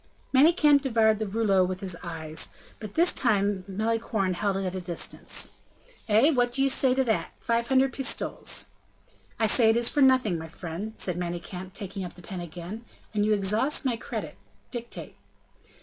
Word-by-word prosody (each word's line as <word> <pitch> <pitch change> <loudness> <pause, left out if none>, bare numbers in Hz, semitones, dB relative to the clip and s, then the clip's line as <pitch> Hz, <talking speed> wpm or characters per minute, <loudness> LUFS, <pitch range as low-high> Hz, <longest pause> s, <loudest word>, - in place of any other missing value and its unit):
Manicamp 295 0 +6
devoured 225 -5 +3
the 220 - -2
rouleau 200 -2 +3
with 185 +1 -3
his 185 -3 -4
eyes; 160 -2 -5 0.3
but 215 -3 -8
this 340 +2 +4
time 205 -5 +1
Malicorne 215 -1 0
held 195 +2 0
it 195 - -2
at 185 - -2
a 185 - -4
distance. 175 -1 -4 0.6
"Eh! 225 +9 +5
what 245 -4 +2
do 270 +2 +1
you 275 - +3
say 260 -1 +3
to 265 - +3
that? 225 -4 -1
Five 235 0 0
hundred 265 +1 +3
pistoles." 270 0 -1 0.7
"I 225 - +3
say 220 +1 +5
it 225 - +4
is 235 0 +1
for 290 - +1
nothing, 255 -10 +4
my 160 - -7
friend," 175 +6 -6
said 180 -2 -2
Manicamp, 180 +1 -5
taking 195 -2 -5
up 180 - -7
the 180 - -14
pen 185 0 -6
again, 175 +6 -7 0.3
"and 210 0 +1
you 215 - +4
exhaust 210 +9 +1
my 250 -3 +2
credit. 230 - -6 0.3
Dictate." 235 -1 -6
215 Hz, 180 wpm, -27 LUFS, 185-245 Hz, 0.7 s, Manicamp